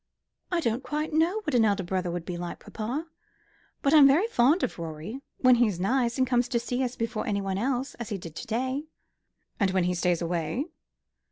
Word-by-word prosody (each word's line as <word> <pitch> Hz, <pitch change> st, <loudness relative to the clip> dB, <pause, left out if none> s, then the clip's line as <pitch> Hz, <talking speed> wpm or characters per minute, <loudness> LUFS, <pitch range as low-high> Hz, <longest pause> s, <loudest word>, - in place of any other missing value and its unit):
"I 350 Hz, -2 st, +1 dB
don't 235 Hz, -3 st, 0 dB
quite 305 Hz, +2 st, -3 dB
know 340 Hz, +7 st, +2 dB
what 305 Hz, -9 st, -3 dB
an 240 Hz, -2 st, +5 dB
elder 200 Hz, -2 st, +2 dB
brother 180 Hz, 0 st, -2 dB
would 170 Hz, -1 st, -4 dB
be 180 Hz, -, -4 dB
like, 175 Hz, 0 st, -5 dB
papa. 245 Hz, +9 st, -4 dB, 0.8 s
But 280 Hz, -, +3 dB
I'm 295 Hz, -3 st, +9 dB
very 300 Hz, +9 st, +4 dB
fond 310 Hz, -, +3 dB
of -, -, -2 dB
Rorie 165 Hz, -, -6 dB, 0.2 s
when 255 Hz, -1 st, +5 dB
he's 215 Hz, -7 st, +2 dB
nice, 235 Hz, +5 st, +1 dB
and 260 Hz, -, +3 dB
comes 245 Hz, -1 st, +2 dB
to 245 Hz, -2 st, 0 dB
see 245 Hz, +2 st, -2 dB
us 250 Hz, 0 st, -2 dB
before 230 Hz, -1 st, -3 dB
anyone 195 Hz, -2 st, -1 dB
else, 260 Hz, +3 st, -1 dB
as 235 Hz, -, -5 dB
he 205 Hz, -, -2 dB
did 165 Hz, -4 st, -9 dB
to -, -, -6 dB
day." 260 Hz, +6 st, -1 dB, 0.7 s
"And 200 Hz, -3 st, +3 dB
when 185 Hz, -1 st, +1 dB
he 180 Hz, +1 st, +1 dB
stays 175 Hz, -1 st, +1 dB
away?" 170 Hz, -, -1 dB
235 Hz, 205 wpm, -27 LUFS, 185-270 Hz, 0.8 s, I'm